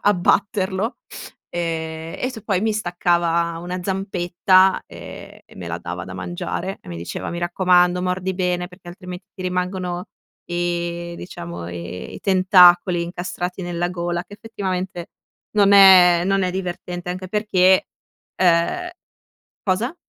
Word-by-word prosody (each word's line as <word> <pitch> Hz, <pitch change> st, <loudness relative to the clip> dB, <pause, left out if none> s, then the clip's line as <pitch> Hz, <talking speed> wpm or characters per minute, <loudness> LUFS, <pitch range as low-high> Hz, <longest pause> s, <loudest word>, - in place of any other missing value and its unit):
abbatterlo 200 Hz, +2 st, +1 dB, 0.5 s
e 160 Hz, -1 st, -4 dB
e 255 Hz, -, -1 dB
t 220 Hz, -4 st, -9 dB
poi 195 Hz, -3 st, 0 dB
mi 220 Hz, 0 st, +1 dB
staccava 170 Hz, -4 st, 0 dB
una 180 Hz, +1 st, -4 dB
zampetta 185 Hz, 0 st, +2 dB
e -, -, -11 dB
e -, -, -18 dB
me 90 Hz, -2 st, -7 dB
la 85 Hz, -, -3 dB
dava 90 Hz, +1 st, -6 dB
da 95 Hz, -, -9 dB
mangiare 90 Hz, -, -4 dB
e -, -, -14 dB
mi 85 Hz, -, -6 dB
diceva: 85 Hz, +1 st, -5 dB
“Mi 170 Hz, -, -4 dB
raccomando, 180 Hz, 0 st, +3 dB
mordi 185 Hz, +1 st, -1 dB
bene, 180 Hz, -1 st, -1 dB
perché 180 Hz, 0 st, -15 dB
altrimenti 180 Hz, +1 st, -9 dB
ti 185 Hz, -, -9 dB
rimangono 180 Hz, -1 st, -2 dB, 0.4 s
i, 175 Hz, 0 st, -3 dB
diciamo, 85 Hz, -, -7 dB
i 90 Hz, +1 st, -7 dB
i -, -, -9 dB
tentacoli 180 Hz, -2 st, +5 dB
incastrati 180 Hz, +1 st, -5 dB
nella 175 Hz, 0 st, -2 dB
gola”, 175 Hz, 0 st, -3 dB
che 205 Hz, -, -12 dB
effettivamente 190 Hz, -5 st, -5 dB, 0.5 s
non 200 Hz, -1 st, +5 dB
è 185 Hz, -3 st, +8 dB
non 195 Hz, 0 st, +1 dB
è 185 Hz, -, 0 dB
divertente, 180 Hz, -1 st, -5 dB
anche 185 Hz, +1 st, -6 dB
perché, 190 Hz, -2 st, +3 dB, 0.5 s
ehm, 185 Hz, -, +2 dB, 0.7 s
cosa? 215 Hz, -, 0 dB
180 Hz, 135 wpm, -21 LUFS, 175-190 Hz, 0.7 s, è